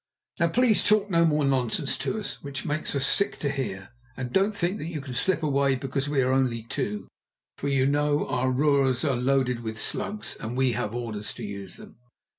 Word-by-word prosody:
Now 170 - +4
please 230 +4 +3
talk 210 -1 +3
no 170 -1 +5
more 150 -2 +2
nonsense 135 +1 0
to 220 - -1
us, 205 - -6
which 140 -1 -5
it - - -12
makes 150 0 -1
us 135 -1 +1
sick 200 +7 +1
to 140 - -1
hear, 100 -9 -4 0.3
and 125 -2 -4
don't 200 +2 +3
think 185 +3 0
that 155 - -4
you 160 -3 -4
can 135 -2 -7
slip 165 +6 +1
away 140 -2 +2
because 135 +1 -2
we 140 -3 +2
are 130 +1 +2
only 125 -4 +1
two, 105 -2 -3 0.5
for - - -2
you 135 -2 +3
know 145 +1 +2
our 130 +1 0
roers 135 -1 +2
are 140 -3 +2
loaded 125 -1 +1
with 110 -2 -5
slugs, 210 - -3
and 115 +3 -4
we 130 -1 +3
have 110 0 -2
orders 110 -3 -4
to 120 - -8
use 100 -2 -7
them." - - -13
135 Hz, 215 wpm, -26 LUFS, 125-150 Hz, 0.5 s, no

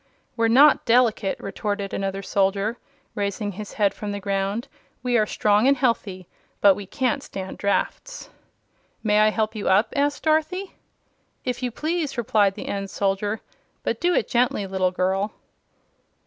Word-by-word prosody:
"We're 230 -1 +2
not 275 +6 +6
delicate!" 230 -4 +2
retorted 200 0 -4
another 195 0 -3
soldier, 200 +4 0 0.3
raising 205 +1 -2
his 205 +2 -8
head 200 -2 +2
from 210 -1 -5
the 200 - -4
ground. 200 +3 -2 0.4
"We 250 -1 +1
are 215 -2 +3
strong 210 +4 +2
and 280 0 +4
healthy; 205 -8 -1 0.3
but 200 -1 +7
we 200 0 -8
can't 255 +2 -1
stand 190 -1 -7
draughts." 205 - -2 0.7
"May 210 -1 +3
I 215 0 +5
help 215 0 -1
you 215 -3 -2
up?" 195 +4 +3
asked 285 0 0
Dorothy. 320 +5 0 0.7
"If 250 -1 -2
you 250 - -1
please," 305 +2 -2
replied 205 -4 +2
the - - -7
end 195 -1 -3
soldier. 205 +2 -1 0.4
"But - - -2
do 350 0 +2
it - - +1
gently, 240 -4 +1
little 190 -1 0
girl." 190 +3 -1
210 Hz, 155 wpm, -24 LUFS, 195-245 Hz, 0.7 s, but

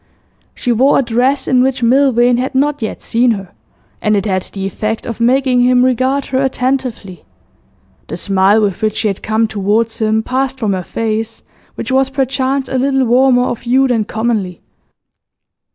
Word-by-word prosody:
She 245 - -2
wore 260 +5 +3
a - - +2
dress 255 +3 0
in 255 -2 +3
which 255 -1 0
Milvain 245 -1 +3
had 260 +2 -3
not 290 +1 +1
yet 220 - -5
seen 240 +2 +1
her, 195 -3 -8 0.5
and 210 -1 +1
it 200 0 -1
had 190 -3 0
the 195 +1 -6
effect 215 +3 -3
of 230 - -6
making 250 +1 +2
him 250 0 +4
regard 260 +2 0
her 260 - +2
attentively. 255 - -2 0.8
The - - -5
smile 195 +3 +2
with 200 -4 -2
which 215 -1 -1
she 220 - 0
had 195 - -5
come 220 +1 0
towards 215 +2 -1
him 220 0 +1
passed 265 +2 -2
from 215 -5 -1
her 185 - -2
face, 225 +3 -4 0.3
which 245 - -5
was 265 0 +2
perchance 270 0 -1
a 260 - -2
little 270 0 +1
warmer 245 +1 +3
of 240 -2 -3
hue 260 +3 +2
than 230 -4 0
commonly. 215 -5 -2
240 Hz, 175 wpm, -15 LUFS, 215-260 Hz, 0.8 s, him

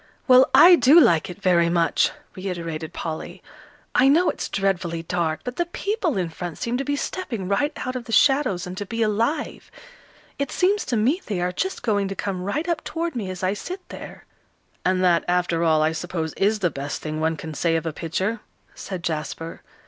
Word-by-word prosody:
"Well, 255 0 +7
I 355 +1 +9
do 270 +7 +7
like 170 - +4
it 180 - -8
very 175 -3 +3
much," 170 -1 +2 0.3
reiterated 170 -4 -5
Polly. 160 -2 -6 0.5
"I 260 - +5
know 330 +6 +4
it's - - -6
dreadfully 180 -4 -1
dark, 165 -2 -1
but 250 0 -6
the 345 - 0
people 370 - -2
in 180 -3 -1
front 170 0 -6
seem 235 +1 -2
to 270 - -2
be 285 +1 -1
stepping 265 - -4
right 200 - +1
out 255 0 -3
of 250 -2 -5
the 230 - -8
shadows, 270 -8 +3
and 180 0 -6
to 205 - -4
be 230 +1 -1
alive. 230 +8 -1 0.7
It 280 - -2
seems 395 +3 +1
to 245 - -1
me 265 - +2
they 200 -4 -2
are 180 +1 0
just 380 - -3
going 205 -4 +1
to 195 - -5
come 190 -2 -3
right 290 - -2
up 335 -3 -1
toward 335 -2 -3
me, 210 -6 -3
as 185 0 -6
I 185 +1 +2
sit 365 - -7
there." - - -10 0.6
"And 185 0 +1
that, 175 -2 +4
after 175 -1 +1
all, 160 -2 +3
I 155 - +2
suppose 160 -1 -4
is 210 +3 +1
the 180 -5 0
best 140 +1 -5
thing 155 0 -3
one 160 0 0
can 160 0 -7
say 165 +2 +1
of 165 - -1
a 160 - -2
picture," 190 +8 -2 0.3
said 185 -3 -7
Jasper. 165 0 -4
190 Hz, 205 wpm, -23 LUFS, 170-255 Hz, 0.7 s, I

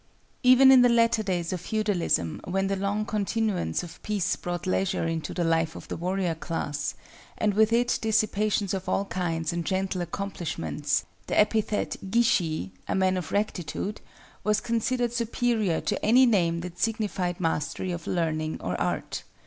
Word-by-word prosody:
Even 255 +1 +7
in 260 -1 +8
the 245 - +6
latter 230 -1 +3
days 180 -4 -2
of 180 - -4
feudalism, 185 - 0
when 195 +2 0
the 195 0 0
long 200 +2 -1
continuance 210 - -1
of 175 -1 -11
peace 205 -4 0
brought 175 0 -4
leisure 185 -2 0
into 165 -1 -2
the 175 - -1
life 165 0 +1
of - - -9
the - - -3
warrior 180 0 -1
class, 150 -3 -3 0.4
and 210 -1 +1
with 220 +2 +4
it 240 +1 +2
dissipations 215 -2 +1
of 190 -1 -3
all 200 - +1
kinds 165 -3 -2
and 170 0 -2
gentle 190 0 -1
accomplishments, 170 - -2 0.2
the - - +1
epithet 215 0 +1
Gishi 175 - +1 0.2
(a - - 0
man 190 -1 +2
of 180 -5 -4
rectitude) 205 0 -2 0.4
was 210 0 +2
considered 235 +1 0
superior 235 -5 0
to 205 - -2
any 250 +5 +6
name 170 -7 +2
that 180 0 -8
signified 205 -6 -1
mastery 165 +2 -1
of 170 -1 -5
learning 155 -2 -1
or 90 - -3
art. - - -2
190 Hz, 160 wpm, -27 LUFS, 170-215 Hz, 0.4 s, in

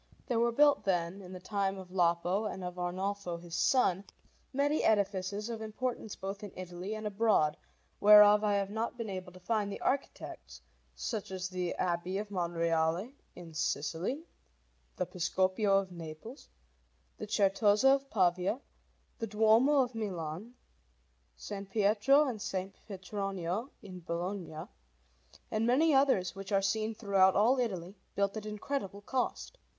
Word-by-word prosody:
There 240 -2 0
were 235 0 +3
built, 285 -3 +4
then, 180 -1 -1
in 180 -1 -11
the 185 - -7
time 195 0 -1
of 185 -1 -10
Lapo 175 +3 +1
and 190 -3 -4
of 180 0 -6
Arnolfo 185 0 -2
his 170 0 -12
son, 200 -8 +2 0.5
many 285 +3 +1
edifices 200 0 +1
of 230 -2 -5
importance 220 0 -4
both 195 +2 -6
in 205 - -7
Italy 180 +3 -6
and 215 0 -6
abroad, 205 -8 +2 0.4
whereof 210 0 +8
I 205 -1 +2
have 200 0 -1
not 225 +3 -3
been 225 -4 -4
able 185 -1 -6
to 185 - -14
find 205 +2 -1
the - - -6
architects, 275 +1 -3 0.4
such 220 -4 -4
as 185 -1 -4
the 180 -1 -3
Abbey 180 +1 -1
of 210 0 -4
Monreale 170 +3 0 0.2
in 170 -2 -11
Sicily, 165 - -2 0.7
the 180 - -1
Piscopio 190 +3 +1
of 195 -1 -1
Naples, 170 - -9 0.7
the 215 - -5
Certosa 210 +4 +4
of 275 0 -1
Pavia, 185 +2 +1 0.6
the 225 - -2
Duomo 225 +7 +4
of 250 0 -6
Milan, 195 0 -5 0.8
S. - - -10 0.2
Pietro 215 +8 +4
and 245 -4 -3
S. 200 - -5 0.3
Petronio 195 +2 -4
in 185 -3 -9
Bologna, 170 -1 -4 0.8
and 220 +1 +1
many 295 +6 +4
others 270 -10 +3
which 195 +1 -8
are 195 -1 +2
seen 220 +3 0
throughout 195 -3 +3
all 235 +6 +4
Italy, 190 -7 -2 0.2
built 200 0 0
at 215 -1 -5
incredible 210 -2 -4
cost. 260 - -3
200 Hz, 145 wpm, -32 LUFS, 180-220 Hz, 0.8 s, whereof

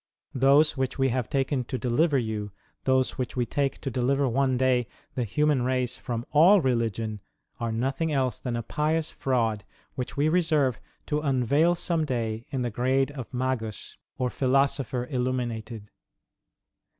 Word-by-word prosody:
Those 140 +4 +4
which 130 -2 -2
we 135 -1 +2
have 125 -1 -1
taken 135 -1 0
to 130 - -3
deliver 140 +5 +2
you, 110 -4 -3 0.3
those 130 -1 +1
which 125 -2 -3
we 120 - +2
take 140 +2 -1
to 135 - -3
deliver 135 +3 +1
one 130 +1 +1
day 125 -2 +2 0.3
the 125 - -1
human 150 +4 +1
race 125 -1 0
from 120 -1 -4
all 175 +7 +7
religion, 115 - -1 0.4
are 115 -1 -2
nothing 135 +8 -1
else 130 -3 0
than 125 -2 -3
a 115 - -2
pious 155 +5 -1
fraud 115 -6 0 0.3
which 125 +1 -5
we 145 +2 +3
reserve 155 -8 +2 0.3
to 150 0 -1
unveil 140 +4 +2
some 170 -2 0
day 115 -5 -3
in 130 -2 -2
the 120 - -2
grade 130 +4 +1
of 135 -3 -8
Magus 125 -4 -3 0.2
or 125 -1 -1
Philosopher 135 -2 +1
Illuminated. 120 -4 -3
130 Hz, 155 wpm, -27 LUFS, 120-140 Hz, 0.4 s, all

